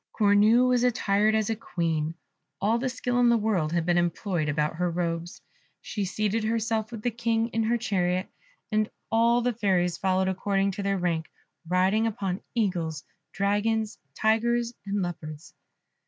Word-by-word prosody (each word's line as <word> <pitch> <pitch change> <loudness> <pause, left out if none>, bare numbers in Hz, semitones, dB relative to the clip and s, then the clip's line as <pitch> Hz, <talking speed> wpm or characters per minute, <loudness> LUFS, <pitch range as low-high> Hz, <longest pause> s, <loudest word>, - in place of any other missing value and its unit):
Cornue 215 +4 +5
was 250 -1 +2
attired 215 -3 +2
as 220 0 +1
a - - 0
Queen; 165 -6 -2 0.4
all 220 +4 +2
the 260 +1 -1
skill 245 -1 -1
in 245 -1 +5
the 235 - +4
world 200 -8 0
had 170 -1 0
been 175 0 +3
employed 175 -2 -1
about 150 +2 -1
her 180 0 +1
robes. 170 0 -3 0.4
She 205 -2 -3
seated 215 +3 -1
herself 225 0 -1
with 225 -3 -7
the 245 - +1
King 230 0 0
in 225 - -1
her 230 +2 +1
chariot, 185 -5 0 0.4
and 215 0 +1 0.2
all 235 +2 +4
the 245 0 +1
fairies 185 -5 +1
followed 190 0 +1
according 195 +1 0
to 195 - -5
their 195 0 0
rank, 170 -3 -1 0.4
riding 190 +5 +2
upon 200 -4 -3
eagles, 175 -9 -1 0.3
dragons, 210 +2 0 0.2
tigers, 235 +2 +1
and 200 -1 0
leopards. 155 -3 -7
205 Hz, 160 wpm, -27 LUFS, 180-225 Hz, 0.4 s, Cornue